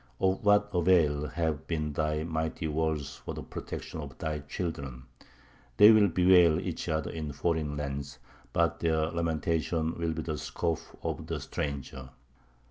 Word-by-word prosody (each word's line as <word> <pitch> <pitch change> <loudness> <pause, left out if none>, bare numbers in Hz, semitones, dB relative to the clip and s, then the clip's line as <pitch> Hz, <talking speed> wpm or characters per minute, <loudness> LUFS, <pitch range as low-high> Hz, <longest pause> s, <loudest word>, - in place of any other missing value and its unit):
Of 95 +2 +1
what 105 0 +4
avail 80 -5 +3
have 80 -2 -2
been 75 -3 -2
thy 75 0 0
mighty 80 0 -2
walls 75 -2 -1
for - - -7
the - - -6
protection - - -6
of - - -9
thy 75 -1 -2
children?... 70 -4 -5 0.7
They 105 - +10
will 110 -2 +6
bewail 90 -2 +5
each 90 -2 -4
other 80 0 -1
in 75 -3 -4
foreign 75 -1 -1
lands; 70 -1 -4 0.3
but 85 0 +1
their 80 -1 +1
lamentations 80 0 0
will 85 -1 0
be 80 0 -4
the 75 -3 -3
scoff 85 -2 -3
of - - -3
the - - -2
stranger." 65 -2 -5
80 Hz, 150 wpm, -29 LUFS, 75-85 Hz, 0.7 s, They